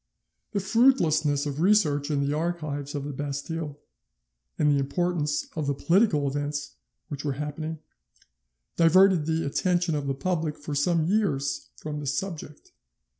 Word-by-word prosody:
The 200 - +1
fruitlessness 165 - +3
of 145 +1 -3
research 160 -7 +3
in 145 -2 +1
the 140 +1 0
archives 155 -4 -3
of 145 - -3
the 145 0 -5
Bastille, 145 +2 -4 0.8
and 150 - +2
the 145 -1 +4
importance 150 +1 -1
of 155 -3 -2
the 140 - 0
political 170 -3 +2
events 145 0 -3 0.4
which 145 -2 -5
were 145 -2 -1
happening, 150 +3 -4 1.0
diverted 175 -1 +5
the 160 0 0
attention 175 +3 +1
of 145 -2 -2
the 135 - -1
public 160 0 -2
for 145 0 -6
some 160 +3 +2
years 180 -8 0
from 150 -1 -6
this 145 -1 -2
subject. 165 -6 -6
150 Hz, 145 wpm, -26 LUFS, 145-175 Hz, 1.0 s, diverted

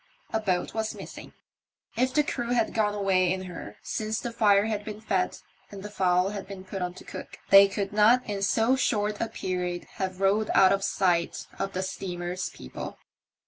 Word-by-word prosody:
A 220 - +2
boat 185 -5 -1
was 220 -1 -2
missing. - - -10 0.6
If 255 +3 +2
the 300 - +5
crew 245 -7 -3
had 230 -2 +1
gone 210 -2 +1
away 190 -3 +2
in 190 0 -2
her 180 -2 -8
since 215 0 -2
the 240 - -4
fire 205 -3 +4
had 215 -2 -2
been 210 0 -7
fed 195 -4 -1 0.3
and 195 -1 -9
the 210 - -7
fowl 180 -1 +2
had 205 -1 -6
been 195 -1 -8
put 190 0 -6
on 180 0 -3
to - - -11
cook, - - -9
they 195 0 +10
could 195 +1 -3
not 225 +4 +5
in 205 -2 -3
so 225 +6 +3
short 210 -5 0
a 230 - +1
period 180 -1 -3 0.2
have 185 -1 -2
rowed 200 +2 +2
out 190 - +7
of 195 0 -1
sight 175 -4 +1
of 195 - -2
the 185 - -1
steamer's 180 -1 -4
people. 65 - -8
200 Hz, 195 wpm, -27 LUFS, 185-215 Hz, 0.6 s, they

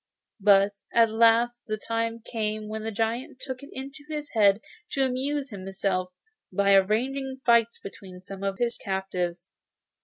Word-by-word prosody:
But 200 0 +5 0.2
at 230 -1 +5
last 230 +2 +3
the 215 -1 -1
time 230 +1 -2
came 215 -2 -3
when 215 +1 -4
the 220 +1 -3
giant 230 +4 -2
took 260 -1 -6
it 280 - -11
into 275 +2 -8
his 300 -1 -5
head 205 -3 +4 0.3
to 270 -1 +2
amuse 270 +2 -2
himself 190 -1 -2 0.4
by 200 +1 +3
arranging 260 +7 +2
fights 235 -1 +4
between 190 -2 -10
some 195 +1 -9
of 195 -1 -1
his 235 +1 -1
captives. 185 -2 -3
220 Hz, 150 wpm, -27 LUFS, 195-245 Hz, 0.4 s, But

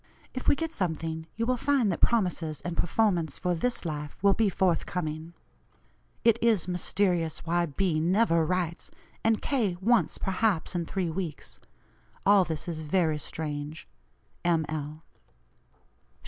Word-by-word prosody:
If 255 - -5
we - - +6
get 325 +2 -3
something, 160 - -3
you 230 - -1
will 250 +1 +1
find 260 -5 +2
that 170 - -4
promises 180 -9 +1
and 175 -1 -4
performance 175 -6 +1
for 180 -1 0
this 235 +5 -1
life 150 -2 -4
will 200 -1 +6
be 220 -1 +2
forth 180 -2 +1
coming. 160 -1 -4 0.9
It 230 -1 +5
is 225 -6 +3
mysterious 180 -2 0
why 170 +1 +1
B. 160 +2 0
NEVER 170 0 +3
writes, 170 0 -2 0.3
and 225 -1 +2
K. 220 -11 0
once, 230 +5 +2
perhaps, 195 -3 0
in 170 -2 -2
three 185 -4 -1
weeks. 160 - -5 0.7
All 200 -1 +6
this 160 -2 -4
is 160 -2 -3
very 155 -1 +1
strange. 150 0 -5 0.6
"M. 165 -2 +2
L." 155 0 -5
175 Hz, 145 wpm, -28 LUFS, 160-205 Hz, 0.9 s, we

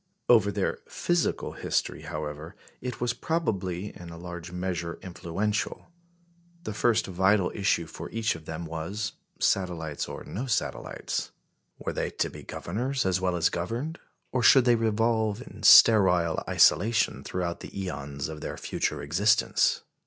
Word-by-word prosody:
Over 110 -4 +5
their - - -1
physical 175 -1 0
history, - - -2
however, 75 +2 -6 0.3
it 125 -1 -5
was 120 -1 0
probably 100 - -2
in 85 -1 -10
a 85 - -9
large 85 0 -8
measure 90 -2 -3
influential. 95 - -3 0.7
The 110 - -4
first 110 +1 +2
vital 95 +1 +2
issue 100 -4 +1
for 80 - -8
each 115 0 0
of 80 -1 -11
them 80 +1 -5
was 85 +7 -4 0.3
satellites 85 -6 0
or - - -7
no 125 +6 -5
satellites? 115 -3 -2 0.5
Were - - -4
they - - -1
to - - -2
be - - -10
governors 125 +8 -3
as 95 -1 +1
well 90 -1 +1
as 85 -1 +3
governed, 120 - -3 0.3
or 130 - 0
should 125 +2 +7
they 120 - +6
revolve 110 -1 +1
in 165 - -12
sterile 90 -7 +7
isolation 110 +4 +3
throughout 85 -2 -3
the - - -8
æons 70 -8 -5
of 80 -1 -7
their - - -5
future - - -2
existence? 105 +10 +2
95 Hz, 145 wpm, -27 LUFS, 85-115 Hz, 0.7 s, should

